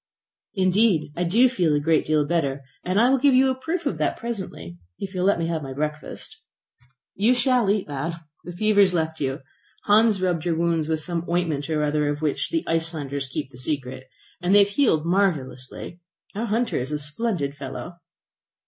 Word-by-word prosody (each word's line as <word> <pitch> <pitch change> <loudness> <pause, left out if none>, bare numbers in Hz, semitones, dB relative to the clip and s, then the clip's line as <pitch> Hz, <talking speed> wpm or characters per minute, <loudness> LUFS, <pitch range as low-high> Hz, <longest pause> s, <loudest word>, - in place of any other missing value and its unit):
"Indeed, 185 -4 +2
I 175 - -1
do 225 +9 +4
feel 180 -12 +1
a - - +2
great 160 +2 +1
deal 155 -1 +2
better, 145 -4 -1 0.2
and 185 +3 +1
I 245 +3 +5
will 270 - +3
give 275 0 +4
you 265 +1 +5
a - - -2
proof 325 +7 -3
of - - -2
that - - 0
presently 190 - -6 0.2
if 195 0 -6
you 185 - -3
will 180 - +2
let 200 - +4
me 165 - -1
have 165 -1 -2
my 135 -2 -6
breakfast." 150 - -5 0.7
"You 225 +6 +3
shall 245 -3 +2
eat, 205 -1 +1
lad. 145 +4 -3 0.3
The 175 - -7
fever 210 +3 +1
has 190 -3 +5
left 160 -1 -1
you. 135 -1 -2 0.4
Hans 210 0 +4
rubbed 180 -4 0
your 170 -2 0
wounds 165 -2 +1
with 160 -1 0
some 170 0 -2
ointment 165 -4 -1
or 155 -1 0
other 150 0 +1
of 145 +1 -3
which 150 -2 -1
the 330 -1 -1
Icelanders 155 -4 -2
keep 135 0 -5
the 125 - -10
secret, 130 -2 -4 0.3
and 180 +3 +3
they - - +8
have 200 - -3
healed 185 - +2
marvellously. 170 -5 -1 0.3
Our 225 +4 -3
hunter 230 +2 0
is 130 +4 -4
a 150 - 0
splendid 150 -1 -2
fellow!" 170 +3 -7
170 Hz, 200 wpm, -24 LUFS, 150-205 Hz, 0.7 s, they